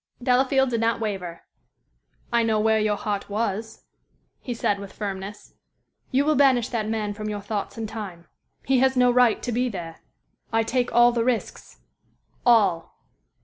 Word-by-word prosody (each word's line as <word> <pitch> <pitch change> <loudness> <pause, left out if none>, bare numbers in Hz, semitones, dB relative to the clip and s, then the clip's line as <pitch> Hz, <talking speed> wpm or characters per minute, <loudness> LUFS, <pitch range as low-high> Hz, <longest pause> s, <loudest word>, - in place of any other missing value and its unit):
Delafield 265 +1 +3
did 230 -1 0
not 230 -1 +1
waver. 190 -6 -4 0.9
"I 235 - +4
know 220 -2 +1
where 220 0 +3
your 215 -1 +1
heart 205 -1 -3
was," 215 +1 -3 0.6
he 250 - -7
said, 205 -4 0
with 200 -1 -8
firmness. 200 0 -6 0.6
"You 275 +2 +2
will 310 - +3
banish 260 -4 +3
that 220 -3 -2
man 215 -2 -2
from 215 +1 -5
your 205 -1 -3
thoughts 205 +1 -4
in 225 - -3
time. 205 -6 -7 0.4
He 265 -1 +3
has 265 0 +2
no 250 0 +5
right 245 -2 +3
to 245 - -2
be 250 +2 0
there. 170 -6 -7 0.5
I 225 0 +2
take 245 +2 -1
all 240 +1 +6
the 235 -1 0
risks 245 -2 -3 0.7
all." 200 -8 +3
225 Hz, 165 wpm, -24 LUFS, 205-245 Hz, 0.9 s, all